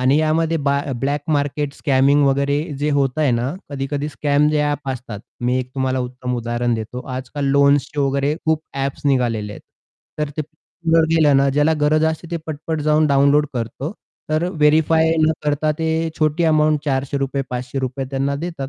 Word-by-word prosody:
आणि 130 +3 +3
यामध्ये 160 +1 +1
ब - - +4 0.3
ब्लॅक 140 +2 0
मार्केट 145 0 0
स्कॅमिंग 140 +1 +3
वगैरे 140 +1 +1 0.2
जे 150 +1 0
होतंय 135 +1 +1
ना 120 +2 0 0.2
कधी-कधी 140 +1 -3
स्कॅम 145 0 +1
जे 150 -1 +1
ॲप 145 -1 -2
असतात. 120 -5 -5 0.2
मी 125 +1 +1
एक 130 -1 -4
तुम्हाला 130 -1 0
उत्तम 125 0 -4
उदाहरण 120 0 -1
देतो. 110 +3 -5
आजकाल 130 +2 -4
लोन्सचे 140 0 +3
वगैरे 140 +1 +1
खूप 160 -1 +1
ॲप्स 135 0 -3
निघालेले 115 -6 0
आहेत. - - -10 0.6
तर 150 -1 -1
ते 155 - -1 0.5
वर 165 -1 +5
गेल्यानं 145 -4 +4
ज्याला 150 +2 +3
गरज 155 +1 +3
असते 160 +1 -1
ते 170 - -1
पट, 155 -2 -4
पट 160 -2 -1
जाऊन 155 +1 +3
डाउनलोड 140 +1 +4
करतो. 125 - -4 0.4
तर 155 +2 +1
व्हेरिफाय 160 0 +3
न 155 0 +4
करता 150 +1 +1
ते 160 - -1 0.3
छोटी 155 +2 +1
अमाउंट 155 -1 +3
₹400 135 0 -1
₹500 130 +1 -3
त्यांना 135 +1 -1
देतात. 160 -4 -5
140 Hz, 165 wpm, -20 LUFS, 130-155 Hz, 0.6 s, वर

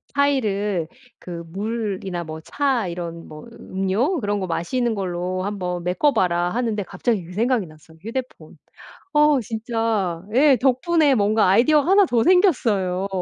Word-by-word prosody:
차이를 210 - 0 0.3
그 170 -2 -7
물이나 195 -2 -4
뭐 160 -1 -7
차 265 - -1
이런 170 -1 -6
뭐 155 0 -11
음료 215 - -1
그런 205 0 -1
거 185 - -3
마시는 225 +8 -1
걸로 185 -1 -3
한번 180 -3 -3
메꿔 185 +12 +1
봐라 175 -4 +1
하는데 225 -1 -1
갑자기 200 +2 -2
그 180 - -11
생각이 230 0 +1
났어요. 155 +1 -18
휴대폰. 245 +5 -7 0.6
어 295 -2 +4
진짜 220 -6 -2
예 275 +1 +5
덕분에 280 +3 +3
뭔가 210 0 +2
아이디어가 290 - +4
하나 395 0 +6
더 235 -7 +1
생겼어요. 220 - +2
210 Hz, 295 characters per minute, -22 LUFS, 180-255 Hz, 0.6 s, 하나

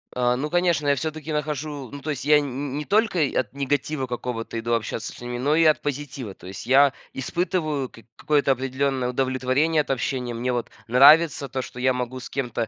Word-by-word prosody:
А, 125 0 +2
ну 150 +4 -3
конечно, 175 -4 +1
я 140 - +4
всё-таки 155 +2 -4
нахожу, 150 -3 -3
ну 145 - -7
то 155 - -5
есть 140 -3 -3
я 150 0 +6
н 140 0 -4
ни 145 - -3
не 150 - -5
только 215 -3 +2 0.2
от 120 -1 -3
негатива 140 0 -1
какого-то 120 -2 -4
иду 115 +1 -1
общаться 115 -1 -2
с - - -13
ними, 120 0 -4
но 140 +5 +1
и 165 - +4
от 155 -1 +4
позитива. 140 -6 -4
То 90 - -14
есть 95 -1 -8
я 135 +2 +5 0.2
испытываю 155 -2 -1
кик 115 - -17
какое-то 145 -2 +2
определённое 130 0 -1
удовлетворение 130 +5 +1
от - - -9
общения. 125 -1 -2
Мне 120 +2 -2
вот 120 -1 -3 0.2
нравится 140 +4 +6
то, 130 0 -3
что 125 - -9
я 130 +1 +3
могу 125 0 -4
с - - -9
кем-то 120 -4 -2
135 Hz, 210 wpm, -24 LUFS, 125-150 Hz, 0.2 s, я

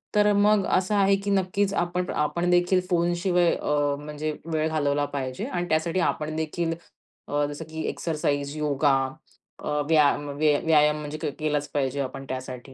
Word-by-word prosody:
तर 210 0 +5
मग 205 -1 +4
असं 190 +3 0
आहे, 195 0 +4
की 200 +1 -4
नक्कीच 195 +1 +1
आपण, 175 0 -1
आपण 170 +4 0
देखील 180 +1 +3
फोन 175 0 +2
शिवाय 175 -1 +2
अ, 145 -1 0
म्हणजे 150 +1 -4 0.2
वेळ 155 0 +1
घालवला 145 -2 +1
पाहिजे. 130 -1 -3
आणि 175 -1 -3
त्यासाठी 165 +3 +1
आपण 155 0 -3
देखील 165 +1 -2 0.5
अ, 145 0 0
जसं 145 +2 -7
की 160 0 -5
एक्सरसाइज, 145 -3 -2
योगा 145 -1 +2 0.7
अ, - - -3 0.2
व्याया 150 -3 +5 0.5
व्यायाम 150 -1 +4
म्हणजे 150 +1 -5
के 155 -2 -3
केलाच 150 -1 -1
पाहिजे 140 -1 -1
आपण 135 +1 -5
त्यासाठी. 130 0 -6
155 Hz, 160 wpm, -25 LUFS, 145-175 Hz, 0.7 s, तर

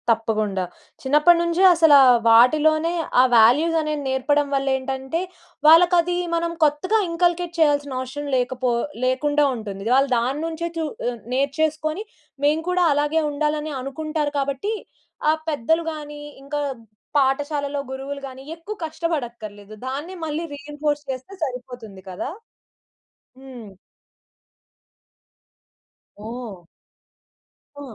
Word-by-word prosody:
తప్పకుండా. 215 -4 0 0.4
చిన్నప్పటినుంచే 340 +5 +3
అసలా 320 -4 +7 0.3
వాటిలోనే 310 +8 +4 0.3
ఆ - - +6
వాల్యూస్ 265 +9 +5
అనేవి 305 -1 -2
నేర్పడం 280 +2 +1
వలేంటంటే 265 +2 -1 0.5
వాళ్ళకది 350 +2 +5 0.2
మనం 335 0 -1
కొత్తగా 305 +8 +2
ఇన్కల్కేట్ 345 0 0
చేయాల్సిన 285 -3 +2
అవసరం 265 +3 -5
లేకపో 250 0 -1 0.3
లేకుండా 290 +3 +2
ఉంటుంది. 200 -4 -7
వాళ్ళు 275 +1 +3
దాని 255 +5 -1
నుంచే 330 +1 -3
చు 325 - -1 0.2
ఆ - - +1 0.2
నేర్చేసుకొని 310 +6 -1 0.4
మేము 305 +2 +2
కూడా 360 -1 +2
అలాగే 295 +3 +1
ఉండాలని 300 +1 -2
అనుకుంటారు 300 +2 -3
కాబట్టి 280 +10 -2 0.6
ఆ - - +3 0.2
పెద్దలు 320 +3 +1
గాని, 295 -1 -8 0.2
ఇంకా 290 +1 -3 0.6
పాఠశాలలో 285 +1 0
గురువులు 275 +1 -6
గాని 260 0 -11
ఎక్కువ 340 +6 -8
కష్టపడక్కర్లేదు 235 -11 -5
దాన్ని 290 +8 -5
మళ్ళీ 310 +1 -3
రీఎన్ఫోర్స్ 295 +1 -3
చేస్తే 260 +8 -8
సరిపోతుంది 245 -7 -7
కదా! 185 +8 -5 1.1
హ్మ్. 255 -5 -11 2.6
ఓహ్! 230 -6 -7 1.2
హా! - - -8
290 Hz, 105 wpm, -22 LUFS, 260-315 Hz, 2.6 s, అసలా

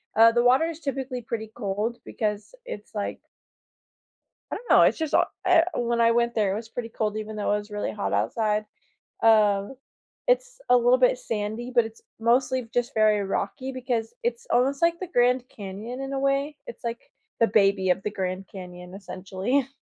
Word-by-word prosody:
Uh, 225 +1 +8
the 240 0 +3
water 260 +6 +5
is 330 -1 -5
typically 265 -3 -3
pretty 220 -1 -5
cold 215 +2 -2
because 210 - -3
it's 210 - -8
like 205 -1 -3 1.3
I - - -1
don't 480 - -9
know. - - +7
It's - - +4
just 315 -2 -3
hot - - +4 0.2
er 330 - +6
when 235 -1 0
I 230 0 +5
went 235 0 +1
there 210 -4 +2
it - - -1
was 225 +1 -6
pretty 230 0 -5
cold 215 -1 -2
even 215 0 -5
though 205 -1 0
it 210 - +2
was 210 +1 -8
really 205 0 -2
hot 205 - -3
outside. 215 -1 0 0.6
Uh, 210 -3 +4 0.6
it's - - +1
a 250 - +8
little 245 +1 +4
bit 250 0 +4
sandy, 220 +2 -3
but 240 -2 +5
it's 225 0 -10 0.2
mostly 250 +1 +2
just 245 +2 -1
very 215 -1 +4
rocky 200 +7 -3
because 245 -3 -2
it's 475 +1 -2
almost 270 +3 +2
like 335 0 +3
the 370 - -3
Grand 250 -3 +2
Canyon 210 +5 -7
in 270 0 -4
a - - -1
way. 275 +2 0
It's 485 - -10
like 235 0 -5 0.3
the 230 - +6
baby 195 -3 +3
of 180 +2 +1
the 210 - -2
Grand 190 -1 -4
Canyon, 180 -1 -10
essentially. 195 +7 -2
230 Hz, 190 wpm, -26 LUFS, 210-255 Hz, 1.3 s, Uh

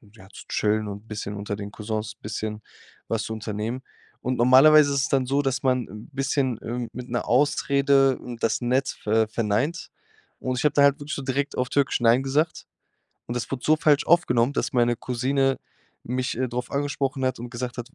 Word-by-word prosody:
ja, 95 -3 -15
zu - - -11
chillen 105 0 0
und 100 +2 -8
bisschen 105 -1 -5
unter 100 0 -4
den 100 0 -7
Cousins 110 0 -4
bisschen 105 0 -5 0.5
was 115 -1 -1
zu 110 - -4
unternehmen. 110 +3 -4 0.4
Und 125 0 -2
normalerweise 140 +4 +6
ist 140 - +1
es - - -1
dann 135 -2 +2
so, 140 +2 +2
dass 135 -1 -1
man 125 -3 +1
'n 105 +6 -11
bisschen, 135 -3 -1
ähm, 120 0 -4
mit 125 0 -7
'ner 120 - -2
Ausrede, 140 0 +3
ähm, 120 -1 -8
das 115 - 0
nett 130 +3 +1
ver 110 +1 +2
verneint. 115 - -1 0.5
Und 130 -1 -2
ich - - -2
habe 150 - +3
da 145 - +3
halt 140 +1 +4
wirklich 145 +3 -5
so 140 - -4
direkt 140 +2 -2
auf 125 0 0
Türkisch 140 -3 +1
„Nein“ 120 +3 +4
gesagt. 150 +4 0 0.6
Und 120 - -4
das 120 - -3
wurde 130 -2 -4
so 155 - +5
falsch 150 -2 +3
aufgenommen, 140 -7 +3
dass - - -2
meine 120 -1 +3
Cousine 135 +3 0 0.5
mich, 125 -1 -2
äh, 130 - 0
drauf 125 +1 -4
angesprochen 140 -1 -1
hat 130 -2 -1
und 120 0 -7
gesagt 125 0 -5
hat:„ 120 +2 -6
125 Hz, 200 wpm, -25 LUFS, 115-135 Hz, 0.6 s, normalerweise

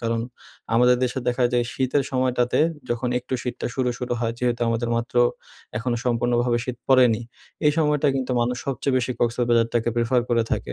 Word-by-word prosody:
কারণ 115 -1 -1 0.5
আমাদের 125 +1 +5
দেশে 125 +1 -2
দেখা 125 +1 +1
যায় 120 -1 +2
শীতের 130 +2 +1
সময়টাতে 125 -2 +1 0.3
যখন 120 +1 -1
একটু 125 +1 -5
শীতটা 125 - -4
শুরু, 130 -2 0
শুরু 125 -1 -3
হয় 115 -1 0
যেহেতু 120 -1 0
আমাদের 115 +1 -1
মাত্র 115 +1 -4 0.6
এখনো 120 +1 -1
সম্পূর্ণভাবে 120 0 +1
শীত 125 -1 -4
পড়েনি। 125 -4 +5 0.5
এই 150 - +5
সময়টা 150 -2 +2
কিন্তু 130 -1 -2
মানুষ 120 +1 0
সবচেয়ে 135 0 -1
বেশি 125 0 -2
কক্সেস 120 +1 +1
বাজারটাকে 115 0 +2
প্রেফার 120 +2 +2
করে 115 -1 +2
থাকে। - - -2
125 Hz, 175 wpm, -23 LUFS, 120-130 Hz, 0.6 s, আমাদের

